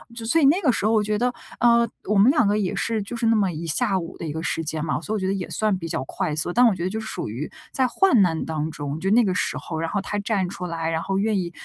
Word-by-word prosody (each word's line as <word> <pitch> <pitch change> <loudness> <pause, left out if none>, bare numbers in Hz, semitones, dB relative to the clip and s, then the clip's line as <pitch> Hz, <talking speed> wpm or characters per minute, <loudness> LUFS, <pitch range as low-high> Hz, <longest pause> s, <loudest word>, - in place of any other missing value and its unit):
就 230 - -6
所 285 +9 +3
以 - - +5
那 320 +8 +4
个 290 -8 +3
时 215 - -2
候 220 - +3
我 215 -1 +3
觉 210 0 0
得， 245 +3 0 0.3
呃， 235 -1 +4 0.2
我 210 - +1
们 210 +7 +6
2 290 -8 +3
个 205 +1 +2
也 195 -4 -1
是， 225 -2 -1
就 205 +4 -6
是 235 - -2
那 225 - +4
么 200 -4 +2
一 165 +1 -6
下 190 +5 +1
午 165 - -8
的 - - -6
一 155 - -3
个 160 +1 -5
时 165 -1 -1
间 155 0 -3
嘛， 155 -1 -1
所 210 - -4
以 - - 0
我 - - -3
觉 190 - -2
得 195 - +1
也 190 -2 -4
算 215 -2 0
比 165 -2 -6
较 130 - -2
快 150 +2 -3
速， 160 +3 -2
但 245 +1 +5
我 215 - +2
觉 170 - -4
得 185 - 0
就 220 +3 -3
是 220 - -7
属 - - -4
于 125 +8 -5 0.2
在 260 -1 +1
患 265 - +4
难 165 -4 +1
当 155 -1 -2
中， 145 0 -5
就 190 +3 -1
那 235 +3 +5
个 190 -4 +1
时 - - -1
候， 160 -2 -5
然 165 0 -2
后 205 - -1
他 205 +1 -3
站 200 -3 0
出 180 -1 -6
来， 165 -1 -3
然 160 0 -1
后 195 +2 -2
愿 210 +1 +1
意 175 -2 -3
195 Hz, 350 characters per minute, -23 LUFS, 165-225 Hz, 0.3 s, 们